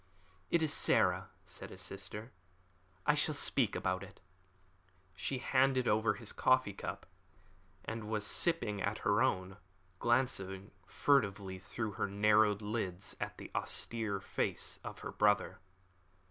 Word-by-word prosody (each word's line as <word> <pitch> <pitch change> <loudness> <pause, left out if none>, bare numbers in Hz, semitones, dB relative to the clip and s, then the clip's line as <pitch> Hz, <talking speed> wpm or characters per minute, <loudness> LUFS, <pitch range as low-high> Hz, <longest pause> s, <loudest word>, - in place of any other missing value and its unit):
"It 170 - +2
is 155 - +3
Sarah," - - +3 0.2
said - - -8
his 95 - -10
sister; 105 +4 -7 0.7
"I 150 - +5
shall 150 +1 +4
speak 135 -5 +2
about 95 0 -1
it." 100 -1 -11 1.0
She 130 +8 -2
had 125 - -7
handed 130 -1 +4
over 110 0 +2
his 115 -3 -3
coffee 130 -5 +2
cup, - - -6 0.8
and 110 -1 -5
was 105 -2 0
sipping 105 -8 +1
at 100 +3 -1
her 100 +2 +3
own, 95 -6 0 0.4
glancing 100 -6 0 0.2
furtively 100 -6 +1
through 110 +3 -4
her 100 - -2
narrowed 105 +1 +3
lids 100 -4 -3
at - - -4
the - - -9
austere 110 -4 -1
face - - -2
of - - -8
her - - -5
brother. 105 -2 +2
105 Hz, 135 wpm, -34 LUFS, 100-120 Hz, 1.0 s, I